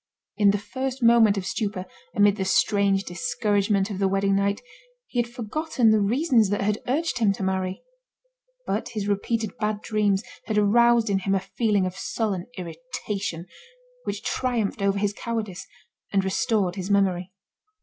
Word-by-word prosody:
In 205 -1 +4
the 200 - +3
first 260 +5 -4
moment 230 -3 +6
of 190 - -3
stupor, 190 0 -2 0.3
amid 205 0 +4
the 190 - -1
strange 195 0 +2
discouragement 200 +4 0
of 195 - -4
the 195 - +3
wedding 195 0 +1
night, 200 +1 +1 0.5
he 245 - -3
had 235 - -5
forgotten 240 0 +1
the 215 - +4
reasons 230 - +3
that 205 - 0
had 210 +2 0
urged 295 +2 0
him 215 -3 +4
to 195 - -5
marry. 190 0 -2 0.8
But - - -2
his 210 -3 -4
repeated 215 +2 -1
bad 210 -1 -1
dreams 210 -2 +1 0.2
had 215 - -1
aroused 235 +2 +4
in 195 - +2
him 195 +1 0
a - - +2
feeling 205 -1 0
of 185 0 -4
sullen 195 -6 -2
irritation, 195 -2 -5 0.6
which - - -4
triumphed 235 -5 -1
over 200 0 +2
his 205 0 0
cowardice, 210 -5 -4 0.4
and 195 -1 +1
restored 190 -1 0
his 190 +1 -4
memory. 190 -2 +1
205 Hz, 160 wpm, -25 LUFS, 195-225 Hz, 0.8 s, moment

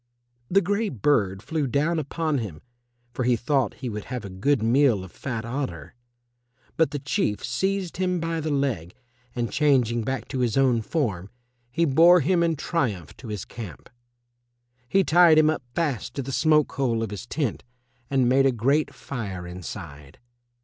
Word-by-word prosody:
The 195 +2 +4
grey 205 +4 0
bird 100 -6 +1
flew 155 -4 -1
down 150 +6 +1
upon 155 0 -1
him, 95 -10 -6 0.5
for 130 - -2
he 125 0 +3
thought 125 -2 0
he - - -1
would 105 -3 -5
have 125 -4 -5
a 100 - -7
good 110 +6 +1
meal 120 -3 +3
of 95 - -11
fat 115 -4 -5
otter. 130 +3 -4 0.8
But 160 -4 +3
the 145 - -4
Chief 135 -6 -1
seized 195 -2 -1
him 180 -1 0
by 165 0 -2
the 155 0 -3
leg, 130 - -1 0.4
and 120 -4 -2
changing 125 -6 +2
back 130 +4 -3
to 130 - -3
his 120 -2 +1
own 130 -4 +3
form, 105 - -2 0.4
he 165 +8 +1
bore 165 +5 +6
him 175 +4 +2
in 165 -1 +2
triumph 120 - -2
to 125 - -10
his 105 -3 -5
camp. 105 - -9 1.0
He 195 0 +4
tied 170 -2 +6
him 155 0 +5
up 155 - -3
fast 140 -8 -2
to 140 - -2
the 135 - -5
smoke 150 +1 +3
hole 120 -5 0
of 110 - -4
his 105 +3 -7
tent 140 -7 -2 0.5
and 130 -3 +2
made 135 +2 +4
a - - +3
great 135 +6 +1
fire 100 -9 -6
inside. 85 -5 -9
135 Hz, 175 wpm, -25 LUFS, 110-155 Hz, 1.0 s, bore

